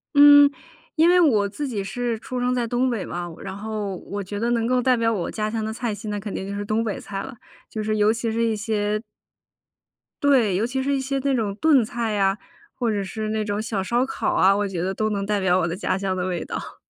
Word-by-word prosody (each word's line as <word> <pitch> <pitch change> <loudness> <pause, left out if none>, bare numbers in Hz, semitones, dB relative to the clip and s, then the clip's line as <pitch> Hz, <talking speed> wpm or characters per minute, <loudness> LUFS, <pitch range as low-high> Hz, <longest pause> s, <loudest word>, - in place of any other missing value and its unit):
嗯， 290 0 +9 0.5
因 325 +1 +5
为 360 +1 +6
我 225 - +4
自 280 +9 -4
己 215 -6 -3
是 235 +3 -2
出 250 +2 -5
生 250 0 +1
在 245 -1 0
东 245 +2 +1
北 225 -6 -2
嘛， 175 0 -5
然 190 -1 -6
后 210 -2 -4
我 200 +3 -6
觉 205 +2 -5
得 235 - 0
能 230 -1 +1
够 250 +1 +2
代 255 0 +3
表 230 0 +2
我 185 -5 -2
家 215 -1 -2
乡 225 -1 -2
的 220 - -2
菜 235 -1 -3
系 205 +1 -8
那 205 0 -2
肯 205 0 -6
定 190 - -4
就 200 - -4
是 205 - -4
东 215 +2 0
北 215 -3 -3
菜 195 -1 -5
了， 265 +3 -8 0.3
就 215 - -4
是 215 0 0
尤 210 +1 +4
其 230 0 -2
是 230 +1 0
一 225 -1 +1
些 210 0 -1 1.2
对， 250 -9 +4
尤 215 +5 +1
其 265 +1 -2
是 280 +1 +1
一 - - 0
些 270 +1 -2
那 275 0 0
种 215 -5 -1
炖 285 +1 +4
菜 230 0 -3
呀， 195 -1 +2 0.4
或 240 -3 0
者 205 -1 -1
是 215 +3 -4
那 215 0 -1
种 205 0 -2
小 215 -3 -2
烧 240 +7 +1
烤 - - -2
啊， 195 +1 +5
我 205 0 0
觉 185 -3 -4
得 190 +2 -1
都 215 +3 -1
能 200 -1 -2
代 210 0 0
表 185 -2 +3
我 170 - +1
的 170 - -3
家 190 -2 -1
乡 190 -1 -1
的 180 - -2
味 175 -3 -2
道。 - - -7
215 Hz, 275 characters per minute, -23 LUFS, 200-245 Hz, 1.2 s, 嗯